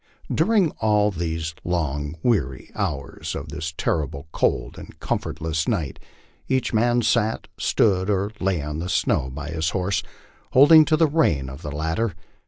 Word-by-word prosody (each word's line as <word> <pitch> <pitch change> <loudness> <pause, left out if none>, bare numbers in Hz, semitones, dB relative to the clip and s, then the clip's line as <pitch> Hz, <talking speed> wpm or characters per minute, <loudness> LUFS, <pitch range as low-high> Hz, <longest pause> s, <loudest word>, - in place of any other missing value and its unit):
During 205 -8 +3
all 105 -1 +3
these 80 -2 -3
long 75 -4 -2
weary 70 - 0
hours - - -3
of - - -6
this 80 +3 -4
terribly 75 -2 -1
cold - - 0
and - - -12
comfortless 80 0 -2
night 75 -6 -1 0.5
each 130 -2 0
man 120 +2 +3
sat, 110 0 +1
stood, 95 -2 +2
or 100 0 0
lay 90 -5 0
on 75 +1 -4
the 90 +2 -4
snow 65 - +1
by 70 +3 -6
his 80 -1 -1
horse, 95 +2 0 0.5
holding 155 +4 +8
to 155 0 +2
the 165 - +5
rein 80 - +1
of 70 +3 -10
the 75 - -5
latter. 80 +7 -1
85 Hz, 155 wpm, -23 LUFS, 75-110 Hz, 0.5 s, holding